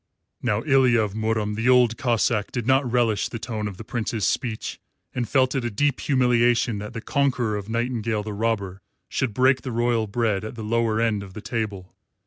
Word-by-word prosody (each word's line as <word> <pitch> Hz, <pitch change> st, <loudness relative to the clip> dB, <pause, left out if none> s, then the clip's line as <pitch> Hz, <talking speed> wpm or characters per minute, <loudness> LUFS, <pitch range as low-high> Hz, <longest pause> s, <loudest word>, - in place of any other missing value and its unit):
Now 110 Hz, -1 st, 0 dB
Ilya 130 Hz, -5 st, +4 dB
of 105 Hz, -3 st, 0 dB
Murom 110 Hz, -1 st, -1 dB
the 115 Hz, +3 st, +1 dB
Old 125 Hz, -3 st, +5 dB
Cossáck 115 Hz, -5 st, +1 dB
did 120 Hz, -3 st, -3 dB
not 130 Hz, -1 st, +2 dB
relish 115 Hz, -4 st, +1 dB
the -, -, -5 dB
tone 110 Hz, -2 st, -4 dB
of 100 Hz, -3 st, -7 dB
the 110 Hz, -, -8 dB
Prince's 115 Hz, -3 st, -2 dB
speech, 115 Hz, -4 st, -2 dB, 0.3 s
and 120 Hz, -3 st, -2 dB
felt 130 Hz, -2 st, +3 dB
it 135 Hz, -, -1 dB
a 120 Hz, -, -1 dB
deep 140 Hz, +5 st, 0 dB
humiliation 120 Hz, -3 st, +2 dB
that 105 Hz, +1 st, -7 dB
the 115 Hz, -, -5 dB
conqueror 125 Hz, -5 st, 0 dB
of 105 Hz, 0 st, -5 dB
Nightingale 115 Hz, -2 st, -1 dB
the 105 Hz, 0 st, -5 dB
Robber 100 Hz, -3 st, -2 dB, 0.3 s
should 130 Hz, -4 st, -1 dB
break 130 Hz, +4 st, +3 dB
the 130 Hz, -, -5 dB
royal 120 Hz, -1 st, +1 dB
bread 105 Hz, -2 st, 0 dB
at 110 Hz, -, -6 dB
the 115 Hz, -, -6 dB
lower 115 Hz, 0 st, +1 dB
end 115 Hz, -3 st, +1 dB
of 95 Hz, -2 st, -11 dB
the 110 Hz, -, -6 dB
table. 100 Hz, -6 st, -4 dB
115 Hz, 200 wpm, -24 LUFS, 105-125 Hz, 0.3 s, Old